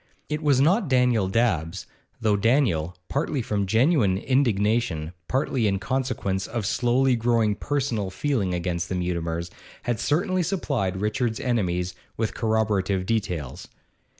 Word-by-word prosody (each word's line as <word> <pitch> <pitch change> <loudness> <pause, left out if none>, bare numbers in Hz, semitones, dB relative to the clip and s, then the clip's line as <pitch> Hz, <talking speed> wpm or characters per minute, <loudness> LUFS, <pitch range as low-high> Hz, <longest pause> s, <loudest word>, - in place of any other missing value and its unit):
It 150 0 -2
was 145 -4 +3
not 180 - +3
Daniel 125 -6 +3
Dabbs, 95 -7 0 0.3
though 110 -2 +2
Daniel, 100 - +1
partly 140 -2 -1
from 100 -3 -1
genuine 115 - +3
indignation, 105 - +1
partly 130 -3 +1
in 100 -1 +1
consequence 100 -5 -2
of 115 -3 -3
slowly 125 +4 +2
growing 115 -2 +2
personal 125 -6 -2
feeling 110 -3 -1
against 85 -1 -2
the 95 - -1
Mutimers, 85 -1 -2 0.3
had 120 -3 -1
certainly 180 +4 +1
supplied 140 - -1
Richard's 110 +1 -1
enemies 90 -7 -1 0.2
with 110 -1 -1
corroborative 105 -4 0
details. 90 - -2
110 Hz, 125 wpm, -25 LUFS, 95-130 Hz, 0.3 s, was